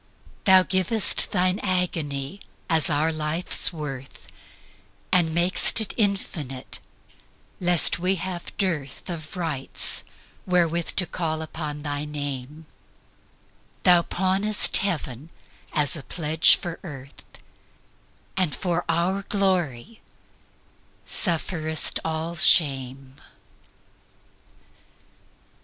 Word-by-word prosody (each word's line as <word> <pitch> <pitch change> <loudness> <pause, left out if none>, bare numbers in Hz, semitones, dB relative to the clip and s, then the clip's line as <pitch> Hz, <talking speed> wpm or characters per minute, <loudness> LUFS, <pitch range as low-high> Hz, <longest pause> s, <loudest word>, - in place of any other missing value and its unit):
Thou 190 -1 +7
giv'st 190 +4 +2
Thine 185 +1 +1
agony 165 -4 -2 0.3
as 160 -1 +3
our 155 +2 +1
life's 155 +3 +1
worth, 135 -5 -8 0.9
And 175 -3 +3
mak'st 175 +6 +2
it 220 - +2
infinite, 165 - -2 0.8
lest 175 -2 +4
we 185 +2 +1
have 180 -1 -6
dearthOf 165 -1 -4
rights 160 -7 -1 0.4
wherewith 170 -2 +1
to 185 - +6
call 160 -2 -3
upon 150 -2 -6
thy 145 0 -3
Name; 145 0 -5 1.2
Thou 175 -1 +6
pawnest 190 +4 +1
Heaven 155 - -2 0.4
as 150 0 +2
a 155 - -5
pledge 160 +2 +4
for 175 -2 -7
Earth, 140 -5 -10 1.1
And 185 -6 0
for 175 -1 -1
our 175 +4 0
glory 185 - -1 1.0
sufferest 160 -3 0
all 160 +1 -3
shame. 135 -5 +2
165 Hz, 90 wpm, -24 LUFS, 150-185 Hz, 1.2 s, Thou